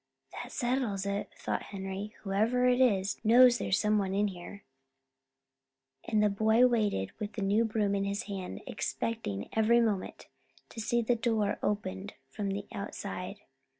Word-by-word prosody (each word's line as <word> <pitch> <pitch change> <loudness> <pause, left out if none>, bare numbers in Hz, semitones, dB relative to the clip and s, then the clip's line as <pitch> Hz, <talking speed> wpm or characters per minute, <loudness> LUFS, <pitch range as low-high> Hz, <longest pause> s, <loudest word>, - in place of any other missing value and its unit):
"That - - -7
settles 240 -7 -1
it," 200 0 -2
thought - - -2
Henry. 195 +1 -6
"Whoever 220 +5 +1
it 250 0 +4
is, 200 -6 +2
knows 245 +2 +7
there's 190 - +1
someone 210 -3 +1
in 205 +1 +2
here." 190 +2 -10 1.4
And 215 -2 +2
the - - +5
boy 220 +4 +4
waited 210 - +1
with 210 0 -4
the 210 - -3
new 205 +4 +3
broom 215 -2 0
in 200 0 0
his 200 +3 -2
hand, 195 -4 -6
expecting 220 - -3
every 220 +2 +4
moment 215 -5 -1 0.4
to - - -9
see 235 +2 +1
the 240 +2 +2
door 225 -3 0
opened 185 - -3 0.2
from 200 +7 -3
the 200 +1 -3
outside. 200 0 -6
210 Hz, 150 wpm, -30 LUFS, 195-230 Hz, 1.4 s, knows